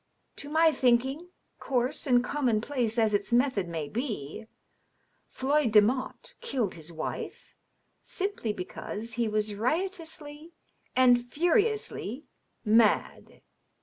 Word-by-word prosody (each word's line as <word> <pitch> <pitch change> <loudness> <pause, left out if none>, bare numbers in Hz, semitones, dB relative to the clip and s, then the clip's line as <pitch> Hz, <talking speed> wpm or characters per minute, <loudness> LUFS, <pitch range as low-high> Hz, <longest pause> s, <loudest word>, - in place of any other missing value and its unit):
To 285 - -8
my 320 +1 +4
thinking, 265 +5 +1 0.3
coarse 255 +2 -1
and 245 -2 +4
commonplace 245 -3 0
as 220 -2 +3
its 205 +2 0
method 240 -6 +2
may 160 -3 -4
be, 220 - -5 0.8
Floyd 275 -2 +1
Demotte 255 - +2
killed 255 - -1
his 160 0 -10
wife 160 -1 -6 0.5
simply 390 - -3
because 210 +3 -6
he 235 0 0
was 215 0 0
riotously 320 - -3 0.4
and 245 -1 +4
furiously 350 - 0 0.4
mad." 220 0 +2
245 Hz, 105 wpm, -28 LUFS, 215-295 Hz, 0.8 s, my